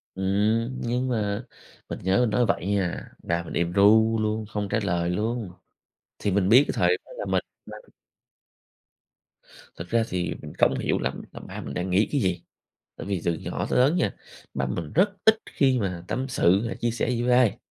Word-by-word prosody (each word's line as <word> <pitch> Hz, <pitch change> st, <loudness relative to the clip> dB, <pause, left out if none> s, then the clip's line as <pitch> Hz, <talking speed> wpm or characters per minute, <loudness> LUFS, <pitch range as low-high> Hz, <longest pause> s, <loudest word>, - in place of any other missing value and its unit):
Ừm, 105 Hz, +6 st, 0 dB
nhưng 125 Hz, +2 st, -1 dB
mà 105 Hz, -2 st, -1 dB, 0.4 s
mình -, -, -5 dB
nhớ 95 Hz, +3 st, +2 dB
mình 120 Hz, -3 st, +2 dB
nói 120 Hz, +3 st, +2 dB
vậy 95 Hz, -3 st, -1 dB
nha, 100 Hz, -3 st, -1 dB
ba 85 Hz, 0 st, -1 dB
mình -, -, -8 dB
im 85 Hz, 0 st, 0 dB
ru 110 Hz, +3 st, +5 dB
luôn, 110 Hz, 0 st, -1 dB
không 105 Hz, -1 st, -4 dB
trả -, -, +1 dB
lời 85 Hz, -3 st, 0 dB
luôn. 110 Hz, +1 st, -2 dB, 0.7 s
Thì 100 Hz, -, -1 dB
mình 95 Hz, 0 st, +2 dB
biết 125 Hz, +5 st, +8 dB
cái -, -, -2 dB
thời 90 Hz, 0 st, +3 dB
đó -, -, -17 dB
là -, -, -4 dB
mình -, -, 0 dB, 0.2 s
đang 105 Hz, 0 st, -10 dB, 2.0 s
Thực 85 Hz, -, -8 dB
ra 115 Hz, -1 st, +3 dB
thì, 90 Hz, -1 st, -2 dB
mình 75 Hz, -1 st, -8 dB
không -, -, +3 dB
hiểu -, -, 0 dB
lắm 65 Hz, +2 st, -3 dB
là -, -, -9 dB
ba -, -, -8 dB
mình 70 Hz, -, -7 dB
đang 90 Hz, +1 st, -3 dB
nghĩ 95 Hz, +4 st, +3 dB
cái 145 Hz, -, +2 dB
gì. 90 Hz, -5 st, -1 dB, 0.5 s
Tại -, -, -8 dB
vì 100 Hz, -3 st, -2 dB
từ 85 Hz, -, +1 dB
nhỏ -, -, -4 dB
tới -, -, +2 dB
lớn 135 Hz, +7 st, +4 dB
nha, 180 Hz, -, +1 dB, 0.4 s
ba 65 Hz, 0 st, -1 dB
mình 75 Hz, +5 st, -4 dB
rất 185 Hz, +6 st, +4 dB, 0.2 s
ít 220 Hz, 0 st, +6 dB
khi 130 Hz, -2 st, +2 dB
mà 90 Hz, -5 st, -3 dB
tâm 130 Hz, +1 st, -2 dB
sự 100 Hz, -3 st, +2 dB
hay -, -, -4 dB
chia 120 Hz, -, -1 dB
sẻ 115 Hz, +1 st, -1 dB
gì 120 Hz, -1 st, -1 dB
với 125 Hz, +1 st, +2 dB
ai. 125 Hz, -4 st, +3 dB
105 Hz, 210 wpm, -25 LUFS, 90-120 Hz, 2.0 s, biết